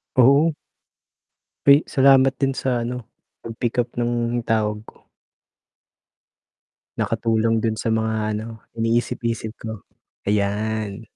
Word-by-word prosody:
Oo. 140 +6 +5 1.1
Ay, 140 +1 +9
salamat 135 0 +5
din 135 0 0
sa 125 -2 -1
ano, 120 -1 -5 0.3
pag-pickup 120 +1 -3
ng 120 0 -1
tawag 105 -1 0
ko. - - -18 1.9
Nakatulong 115 0 +1
dun 110 0 0
sa 110 +2 -3
mga 110 0 0 0.2
ano, 110 0 -8 0.2
iniisip-isip 115 -1 -1
ko, 110 -3 -7 0.5
ayan. 105 +1 -1
115 Hz, 95 wpm, -22 LUFS, 110-125 Hz, 1.9 s, Ay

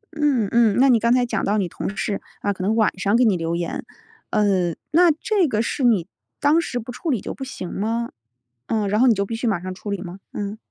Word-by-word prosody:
嗯 285 -8 +2
嗯， 230 -3 +4
那 270 - +6
你 235 -3 +5
刚 235 +2 +3
才 250 -1 +3
讲 240 - -2
到 205 +2 +1
你 195 -4 0
同 195 - -5
事， 205 -2 -2 0.2
啊， 205 - 0
可 185 - -6
能 210 +4 +1
晚 220 -4 +2
上 200 +3 +2
给 245 +1 +4
你 210 -4 +3
留 165 0 -2
言， 170 0 -3 0.5
呃， 195 -5 +2 0.2
那 340 +2 +6
这 375 +3 +1
个 220 -5 0
是 265 +4 -2
你 215 -9 +3 0.3
当 300 +4 +4
时 245 - -4
不 235 +2 -7
处 320 +7 -5
理 250 -7 +1
就 - - -5
不 270 - -7
行 190 -9 -6
吗？ 230 +3 -1 0.6
嗯， 215 -3 0
然 210 +2 +1
后 255 - +5
你 240 - +6
就 200 -1 -1
必 225 - -4
须 230 - -4
马 200 -6 +1
上 185 0 -5
处 205 +3 -6
理 200 -2 -3
吗？ 180 0 -8
嗯。 205 +1 -4
220 Hz, 270 characters per minute, -22 LUFS, 200-250 Hz, 0.6 s, 那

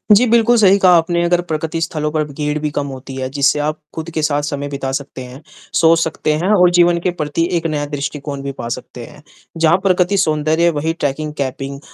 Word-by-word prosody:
जी, 235 +5 +4
बिल्कुल 235 +1 +4
सही 200 -2 +5
कहा 185 -2 +5
आपने 170 +1 +1
अगर 175 0 +2
प्रकृति 160 +1 -2
स्थलों 155 -2 -2
पर 155 0 0
ब - - -11
भीड़ 150 +1 -2
भी 150 0 -2
कम 145 - -1
होती 135 0 -8
है। 130 -1 -3
जिससे 140 +1 +1
आप 150 +1 -1 0.2
ख़ुद 160 +1 -5
के 160 - -2
साथ 145 -1 +1
समय 145 -1 -3
बिता 135 -1 -4
सकते 135 -1 -5
हैं, 125 +2 -10 0.3
सोच 165 0 +4
सकते 160 -2 -1
हैं 160 +4 -1
और 180 -3 +5
जीवन 175 0 +4
के 180 +1 -1
प्रति 150 +2 -1
एक 165 0 -2
नया 150 -2 -2
दृष्टिकोण 145 0 -5
भी 140 - -3
पा 120 -4 -7
सकते 125 0 -7
हैं। 145 - -15 0.4
जहाँ 165 +1 +4
प्रकृति 185 0 +2
सौंदर्य 155 -2 +1
है 170 - +5
वही 160 +1 -2
ट्रैकिंग, 150 -1 -3
केपिंग 135 0 -4
155 Hz, 225 wpm, -17 LUFS, 140-170 Hz, 0.4 s, सही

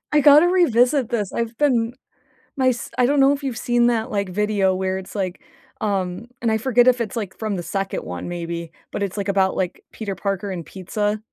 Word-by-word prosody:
I 300 - +5
gotta 295 +4 +7
revisit 270 -7 +3
this, 210 -6 -1
I've 230 0 -3
been 245 -5 +2 0.6
my 260 -1 +4
s 240 -1 -3
I 250 - +4
don't 285 +3 +2
know 270 +1 +6
if 285 0 -5
you've 260 -4 -3
seen 240 0 +2
that, 225 -2 0
like, 200 -2 -1
video 200 0 +1
where 190 0 -1
it's 190 +2 -9
like, 190 -3 -3 0.4
um 195 0 -2
and 230 -2 +1
I 220 - +2
forget 245 +1 +3
if 250 -1 +4
it's, 215 - -3
like, 205 -5 -4
from 215 -2 -2
the 175 - -4
2nd 195 +2 -3
one 90 0 -6
maybe, 170 -1 -5 0.2
but 200 - -2
it's, 200 +1 -4
like, 200 - -2
about, 195 -1 +2
like, 185 -1 -3
Peter 205 -3 -5
Parker 200 0 -2
and 170 -3 -5
pizza? 205 +3 -2
215 Hz, 215 wpm, -22 LUFS, 190-245 Hz, 0.6 s, gotta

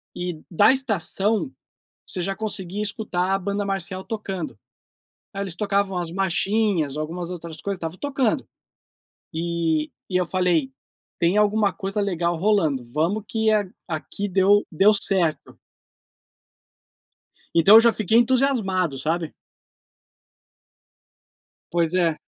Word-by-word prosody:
E 175 -3 -5
da 170 - +5
estação, 220 - 0 0.6
você 185 - -2
já 195 - -1
conseguia 205 -2 -3
escutar 195 -3 -1
a 195 - +3
banda 200 +2 -2
marcial 190 -1 -3
tocando. 195 -6 -5 0.8
Ai 200 - -3
eles 185 -3 -5
tocavam 200 -2 0
as 175 -2 -3
machinhas, 195 -4 0
algumas 170 +3 -4
outras 170 -2 -7
coisas, 200 -2 -3
estavam 165 +1 -5
tocando. 270 -4 0 0.9
E 165 -2 -1 0.2
e 185 - 0
eu 180 - -1
falei: 175 -7 +1 0.5
"Tem 170 +3 +2
alguma 210 -1 +3
coisa 195 +1 -3
legal 175 -3 0
rolando, 160 - +1
vamos 170 +8 0
que 220 -1 +1
a 210 -1 +2 0.2
aqui 175 +5 -4
deu 195 +2 +4
deu 195 +6 +5
certo". 185 -6 0 2.0
Então 170 +6 +7
eu 225 - +10
já 235 -1 +5
fiquei 215 +1 +2
entusiasmado, 230 - +2
sabe? 165 +3 -2 2.4
Pois 170 0 +1
é. 170 -4 +2
190 Hz, 120 wpm, -23 LUFS, 170-210 Hz, 2.4 s, eu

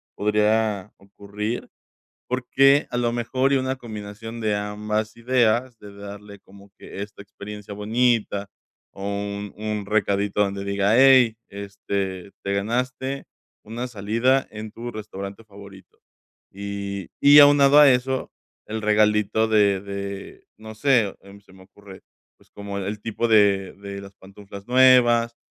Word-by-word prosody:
podría 105 -1 0
ocurrir. 100 +3 -6 0.6
Porque 135 +3 +3
a 120 - -3
lo 120 -1 0
mejor 130 +3 0
y - - +4
una 130 0 -2
combinación 115 -1 -8
de 105 -2 0
ambas 105 +1 -3
ideas, 120 0 +1
de 105 -1 -12
darle 100 0 -10
como 100 +1 -18
que - - -9
esta 100 0 -12
experiencia 105 0 -10
bonita 105 -1 0 0.4
o 95 - -10
un 100 0 -4
un 105 -1 -4
recadito 100 -1 0
donde 100 -1 -1
diga: 100 +2 +1
"Hey, 130 -4 +6
este, 100 -1 -5
te 100 - -2
ganaste 125 +6 -2 0.4
una 120 +4 -5
salida 115 +5 0
en 110 0 -8
tu 120 +2 -7
restaurante 100 -1 -8
favorito". 100 -3 -15 0.5
Y 100 -1 -6
y 145 +1 +8
aunado 145 0 +7
a 145 -2 +8
eso, 130 +1 -1 0.4
el 110 0 -4
regalito 105 +1 +2
de 100 -3 +3
de, 100 0 -7
no 110 0 -10
sé, 115 -4 +2
em, 100 +1 -15
se 100 -2 -21
me 95 0 -16
ocurre, 100 0 -15 0.4
pues, - - -27
como 100 -1 -6
el 100 +2 -4
tipo 115 +1 -2
de 100 -4 +3
de 100 0 -8
las 100 0 -13
pantuflas 100 +1 -13
nuevas, 120 -2 +4
105 Hz, 140 wpm, -23 LUFS, 100-120 Hz, 0.6 s, y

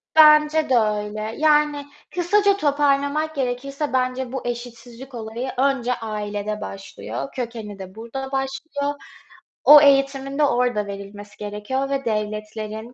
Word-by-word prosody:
Bence 305 -1 +6
de 255 - +4
öyle. 215 0 -1
Yani, 300 -1 +3 0.3
kısaca 400 +3 +3
toparlamak 290 0 +1
gerekirse 275 +2 -3
bence 255 0 -1
bu 265 -2 -5
eşitsizlik 240 +2 -7
olayı 230 +3 -5
önce 260 -2 +1
ailede 210 -2 -4
başlıyor, 195 +7 -6
kökeni 225 -5 -5
de 190 +1 -9
burada 265 +4 -6
başlıyor. 275 +2 -2 0.7
O 295 0 +10
eğitimin 275 0 +3
de 300 - +4
orada 245 -6 +1
verilmesi 200 +1 -9
gerekiyor 210 +6 -3
ve 275 -1 -2
devletlerin, 215 +1 -4
255 Hz, 120 wpm, -22 LUFS, 215-280 Hz, 0.7 s, O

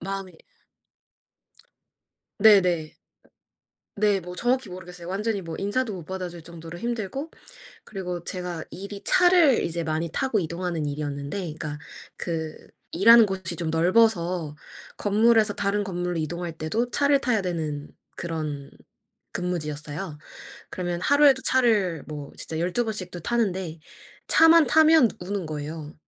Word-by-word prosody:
마음이 195 0 -5 2.1
네네. 180 -7 +5 1.0
네 205 -1 +3
뭐 180 -1 -8
정확히 245 +1 0
모르겠어요. 180 -1 -9
완전히 200 +3 -2
뭐 165 -3 -7
인사도 215 +3 -1
못 175 -3 -8
받아줄 180 -1 -6
정도로 165 0 -10
힘들고 240 - -4 0.5
그리고 180 -4 -5
제가 180 -3 -5
일이 200 +1 -8
차를 355 -7 +5
이제 170 0 -2
많이 160 0 -2
타고 260 -5 0
이동하는 170 -2 -2
일이었는데 145 +2 -4
그러니까 155 -4 -5 0.4
그 160 -2 -4 0.4
일하는 230 +5 +7
곳이 185 -3 -3
좀 165 0 -2
넓어서 175 -2 +2 0.4
건물에서 215 +1 +3
다른 205 +1 0
건물로 180 -3 -3
이동할 170 +2 -3
때도 220 +11 -2
차를 280 -1 +3
타야 245 -6 +1
되는 155 -5 -3 0.3
그런 155 -4 -5 0.6
근무지였어요. 155 -2 -4 0.5
그러면 175 -1 -3
하루에도 285 +1 +5
차를 210 - +2
뭐 145 -2 -7
진짜 160 - -4
12 185 +8 0
번씩도 200 -5 -5
타는데 190 -6 -1 0.5
차만 325 0 +6
타면 315 -3 +6
우는 190 0 -4
거예요. 155 0 -6
180 Hz, 290 characters per minute, -25 LUFS, 165-215 Hz, 2.1 s, 일하는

